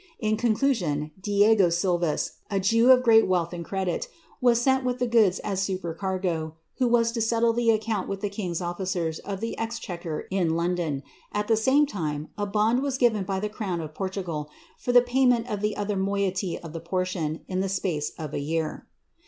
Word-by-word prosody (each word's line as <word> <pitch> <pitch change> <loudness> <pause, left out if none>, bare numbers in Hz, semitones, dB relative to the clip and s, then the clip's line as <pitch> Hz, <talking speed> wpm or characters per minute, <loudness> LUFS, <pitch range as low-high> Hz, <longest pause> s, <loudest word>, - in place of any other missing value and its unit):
In 215 -1 +1
conclusion, 215 - 0
Diego 205 -1 +4
Silvas, 175 -2 0 0.2
a 200 -2 0
Jew 230 +6 +3
of 255 -1 +7
great 225 -2 +6
wealth 180 -2 0
and 170 -1 -5
credit, 190 0 -2 0.3
was 240 -2 +4
sent 265 +1 +2
with 250 -1 -1
the 250 - 0
goods 220 -6 +4
as 195 -2 -1
sih 195 -1 -1
percargo. 175 -2 -3 0.3
who 255 - +3
was 230 -1 +3
to 230 -1 -2
settle 230 +1 +2
the 235 0 +1
account 220 -3 0
with 195 0 -4
tlie 205 -1 -2 0.2
king^s 175 +1 -3
officers 175 -2 -2
of 195 -1 -6
the 230 - -3
ei 225 - 0
I'hequer 175 -8 -5
in 175 -4 +1
London. 170 -5 -1 0.3
At 210 0 -2
the 225 - +4
same 265 +7 +4
time 155 - -4
a 205 -1 -2
bond 215 +5 +2
was 275 -2 -1
given 220 -6 +2
by 190 0 -2
the 210 - -1
crown 205 -4 -3
of 155 -1 -6
Portugal, 180 -5 -4 0.3
for 245 - -2
the 245 0 +7
payment 245 -2 +3
of 210 -4 -3
the 210 0 -1
other 205 0 -1
moiety 195 -1 -1
of 165 -2 -10
the 165 - -5
portiooi 170 -3 -2
in 185 0 -1
ths 195 0 -1
space 165 -6 -1
of 155 -2 -6
a - - -1
year. 160 +2 -3
195 Hz, 200 wpm, -26 LUFS, 170-225 Hz, 0.3 s, of